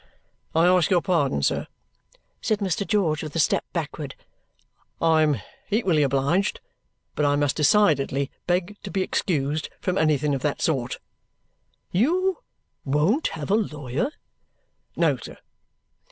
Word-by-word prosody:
"I 165 Hz, +1 st, +5 dB
ask 180 Hz, -2 st, +4 dB
your 175 Hz, -3 st, +3 dB
pardon, 145 Hz, -, +1 dB
sir," -, -, 0 dB, 0.7 s
said 215 Hz, -, +1 dB
Mr. 200 Hz, -1 st, -1 dB
George 175 Hz, -8 st, +1 dB
with 155 Hz, -2 st, -7 dB
a -, -, +1 dB
step -, -, +2 dB
backward. -, -, -4 dB, 0.8 s
"I 160 Hz, -1 st, +4 dB
am 150 Hz, -6 st, +2 dB, 0.3 s
equally 195 Hz, -8 st, +2 dB
obliged. 140 Hz, +8 st, +1 dB, 0.5 s
But 150 Hz, -, -1 dB
I 145 Hz, 0 st, +3 dB
must 145 Hz, -1 st, +1 dB
decidedly 140 Hz, -5 st, +3 dB, 0.2 s
beg 180 Hz, +3 st, 0 dB
to -, -, -7 dB
be 190 Hz, -1 st, 0 dB
excused 155 Hz, -5 st, -1 dB
from 185 Hz, 0 st, -1 dB
anything 150 Hz, -2 st, +2 dB
of 135 Hz, -, -2 dB
that 145 Hz, 0 st, -1 dB
sort." 130 Hz, -6 st, -1 dB, 0.9 s
"You 360 Hz, -, +2 dB, 0.4 s
won't 155 Hz, -, +2 dB
have 155 Hz, +3 st, -4 dB
a -, -, +5 dB
lawyer?" 150 Hz, -, -1 dB, 0.9 s
"No, -, -, +2 dB
sir." -, -, -10 dB
160 Hz, 135 wpm, -24 LUFS, 145-195 Hz, 0.9 s, I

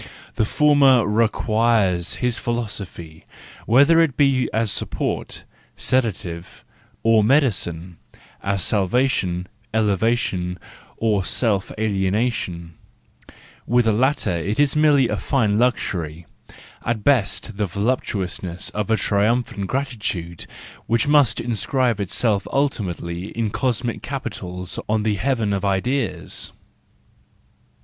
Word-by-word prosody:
The 110 Hz, -, +1 dB
former 140 Hz, -2 st, +4 dB
requires 110 Hz, -4 st, +1 dB
his 125 Hz, -2 st, -1 dB
philo¬ 120 Hz, -1 st, -2 dB
sophy, 85 Hz, -6 st, -9 dB, 0.4 s
whether 140 Hz, +8 st, +5 dB
it 160 Hz, -6 st, +2 dB
be 135 Hz, -3 st, +3 dB
as 110 Hz, -2 st, 0 dB
support, -, -, -3 dB, 0.3 s
sedative, 105 Hz, -9 st, -2 dB, 0.4 s
or 115 Hz, -1 st, +4 dB
medicine, 95 Hz, -, +1 dB, 0.4 s
as 100 Hz, -2 st, 0 dB
salvation, 95 Hz, -3 st, +1 dB, 0.3 s
elevation, 100 Hz, -4 st, 0 dB, 0.4 s
or 105 Hz, -4 st, +1 dB
self 100 Hz, -2 st, 0 dB
alienation; 95 Hz, -4 st, -1 dB, 0.9 s
with 120 Hz, 0 st, +3 dB
the 110 Hz, -, +4 dB
latter 130 Hz, +5 st, +1 dB
it 90 Hz, -, -2 dB
is 145 Hz, 0 st, +3 dB
merely 150 Hz, -4 st, +4 dB
a -, -, -2 dB
fine 110 Hz, -7 st, +1 dB
luxury, 85 Hz, -10 st, -1 dB, 0.6 s
at 115 Hz, -3 st, -2 dB
best 120 Hz, -7 st, +1 dB
the 105 Hz, -1 st, 0 dB
voluptuousness 95 Hz, -4 st, -2 dB
of 105 Hz, -1 st, -3 dB
a 110 Hz, -, +3 dB
triumphant 105 Hz, -1 st, 0 dB
gratitude, 105 Hz, -, -3 dB, 0.4 s
which 115 Hz, +3 st, +1 dB
must 145 Hz, -5 st, +4 dB
inscribe 120 Hz, +1 st, 0 dB
itself 100 Hz, +1 st, 0 dB
ultimately 95 Hz, -10 st, -2 dB
in 110 Hz, -3 st, 0 dB
cosmic 120 Hz, -1 st, -1 dB
capitals 90 Hz, -9 st, -5 dB
on 110 Hz, 0 st, +1 dB
the 110 Hz, -1 st, +1 dB
heaven 115 Hz, -4 st, 0 dB
of 100 Hz, -, -2 dB
ideas. 100 Hz, -, -1 dB
110 Hz, 110 wpm, -22 LUFS, 95-125 Hz, 0.9 s, whether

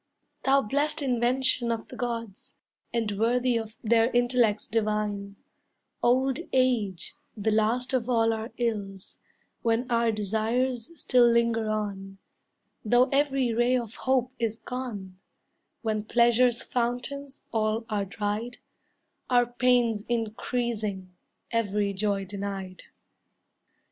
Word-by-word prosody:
Thou 275 Hz, +1 st, +4 dB
blest 285 Hz, +7 st, 0 dB
invention 245 Hz, -1 st, +1 dB
of 225 Hz, -1 st, -4 dB
the -, -, -9 dB
Gods, 230 Hz, -5 st, -5 dB, 0.4 s
And 215 Hz, -4 st, -1 dB
worthy 245 Hz, +2 st, +2 dB
of 220 Hz, -1 st, -4 dB
their 230 Hz, +1 st, +4 dB
intellects 240 Hz, -3 st, +2 dB
divine, 210 Hz, -2 st, -1 dB, 0.7 s
Old 260 Hz, +3 st, +2 dB
age, 230 Hz, -9 st, +1 dB, 0.2 s
the 215 Hz, +1 st, 0 dB
last 225 Hz, +4 st, +1 dB
of 250 Hz, -1 st, 0 dB
all 225 Hz, -2 st, +3 dB
our 225 Hz, +2 st, -5 dB
ills, 205 Hz, -5 st, -3 dB, 0.4 s
When 230 Hz, +2 st, +1 dB
our 235 Hz, -1 st, +3 dB
desires 225 Hz, -, -1 dB
still 245 Hz, -2 st, +5 dB
linger 230 Hz, -1 st, +2 dB
on, 195 Hz, -2 st, -3 dB, 0.7 s
Though 245 Hz, +4 st, +4 dB
every 275 Hz, -4 st, +1 dB
ray 240 Hz, +2 st, +3 dB
of 230 Hz, -3 st, -5 dB
hope 255 Hz, -1 st, 0 dB
is 225 Hz, -2 st, -1 dB
gone; 215 Hz, -8 st, -6 dB, 0.6 s
When 215 Hz, -2 st, -1 dB
pleasure's 240 Hz, +1 st, +3 dB
fountains 255 Hz, +3 st, -3 dB
all 220 Hz, 0 st, 0 dB
are 205 Hz, -2 st, -1 dB
dried, 210 Hz, +4 st, -3 dB, 0.7 s
Our 245 Hz, -1 st, +4 dB
pains 240 Hz, -3 st, +2 dB
increasing, 220 Hz, -4 st, -2 dB, 0.4 s
every 205 Hz, -3 st, 0 dB
joy 200 Hz, 0 st, -1 dB
denied! 195 Hz, -1 st, -6 dB
230 Hz, 115 wpm, -27 LUFS, 210-245 Hz, 0.7 s, still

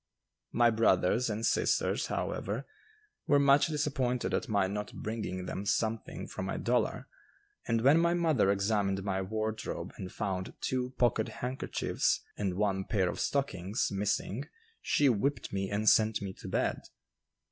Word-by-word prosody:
My 120 Hz, 0 st, +4 dB
brothers 110 Hz, +1 st, +3 dB
and 110 Hz, +2 st, -2 dB
sisters, -, -, +1 dB
however, 110 Hz, +8 st, -3 dB, 0.6 s
were 145 Hz, -, +5 dB
much 140 Hz, +1 st, +5 dB
disappointed 140 Hz, -5 st, -1 dB
at -, -, -1 dB
my 100 Hz, -3 st, +2 dB
not 105 Hz, +2 st, -4 dB
bringing 105 Hz, -4 st, -4 dB
them 95 Hz, -, -4 dB
something 110 Hz, +2 st, -1 dB
from -, -, -5 dB
my -, -, -2 dB
dollar, -, -, 0 dB, 0.6 s
and 115 Hz, -1 st, +1 dB
when 140 Hz, +6 st, +6 dB
my 170 Hz, +1 st, +3 dB
mother 160 Hz, -, +2 dB
examined 100 Hz, -1 st, 0 dB
my 95 Hz, -1 st, -1 dB
wardrobe 110 Hz, +3 st, -3 dB
and 90 Hz, -1 st, -6 dB
found 95 Hz, -3 st, -3 dB
two 130 Hz, 0 st, -2 dB
pocket 120 Hz, -3 st, +2 dB, 0.2 s
handkerchiefs 130 Hz, +2 st, -1 dB
and 95 Hz, -3 st, -2 dB
one 95 Hz, -1 st, 0 dB
pair 95 Hz, -5 st, +1 dB
of -, -, -5 dB
stockings 105 Hz, -7 st, -1 dB
missing 105 Hz, +6 st, -1 dB, 0.3 s
she 145 Hz, -, +3 dB
whipped 135 Hz, +2 st, 0 dB
me 95 Hz, -1 st, -1 dB
and 105 Hz, +1 st, -1 dB
sent 110 Hz, 0 st, +5 dB
me 100 Hz, -1 st, -5 dB
to -, -, -10 dB
bed. -, -, 0 dB
110 Hz, 145 wpm, -31 LUFS, 100-125 Hz, 0.6 s, when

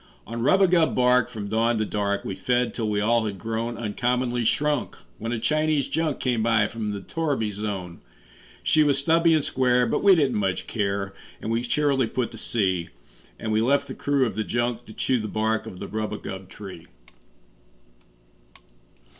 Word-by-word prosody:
On 115 Hz, +1 st, -5 dB
rubagub 175 Hz, +3 st, +4 dB
bark, 125 Hz, -1 st, +4 dB
from 105 Hz, -2 st, -6 dB
dawn 115 Hz, +2 st, +1 dB
to 110 Hz, -, 0 dB
dark, 100 Hz, -1 st, -1 dB
We -, -, -3 dB
fed, 120 Hz, +5 st, 0 dB
till 110 Hz, -3 st, -2 dB
we 105 Hz, -1 st, 0 dB
all 115 Hz, +1 st, +2 dB
had 100 Hz, -2 st, -4 dB
grown 115 Hz, +3 st, -3 dB
Uncommonly 120 Hz, +2 st, -1 dB
shrunk, 150 Hz, +6 st, 0 dB, 0.2 s
when 115 Hz, +2 st, -3 dB
a 120 Hz, -, -1 dB
Chinese 155 Hz, +3 st, +1 dB
junk 160 Hz, -3 st, -1 dB
Came 125 Hz, -3 st, 0 dB
by 115 Hz, -2 st, +3 dB
from 110 Hz, -1 st, -4 dB
the 100 Hz, -1 st, -4 dB
torriby 140 Hz, -6 st, -1 dB
zone. 100 Hz, -4 st, -5 dB, 0.6 s
She 155 Hz, -, +4 dB
was 145 Hz, -2 st, +3 dB
stubby 165 Hz, +3 st, +4 dB
and 155 Hz, -, +1 dB
square, 125 Hz, -1 st, +2 dB
but 115 Hz, -, 0 dB
we 200 Hz, -2 st, +7 dB
didn't 140 Hz, -9 st, +2 dB
much 95 Hz, -2 st, -1 dB
care, 100 Hz, -2 st, -2 dB, 0.3 s
And 110 Hz, -, -4 dB
we 115 Hz, +1 st, +1 dB
cheerily 135 Hz, 0 st, +1 dB
put 125 Hz, +1 st, -2 dB
to -, -, -10 dB
sea; 95 Hz, -6 st, -1 dB, 0.5 s
And 110 Hz, -, -4 dB
we 110 Hz, 0 st, +2 dB
left 140 Hz, +4 st, +2 dB
the -, -, -6 dB
crew 140 Hz, -2 st, +1 dB
of 115 Hz, -, -2 dB
the 110 Hz, -, -1 dB
junk 120 Hz, +1 st, -2 dB
to 110 Hz, -, -10 dB
chew 130 Hz, +2 st, 0 dB
The 110 Hz, -, -3 dB
bark 110 Hz, +1 st, -1 dB
of 95 Hz, -, -8 dB
the -, -, -6 dB
rubagub 105 Hz, -3 st, -5 dB
tree. 95 Hz, -5 st, -10 dB
115 Hz, 180 wpm, -25 LUFS, 105-130 Hz, 0.6 s, we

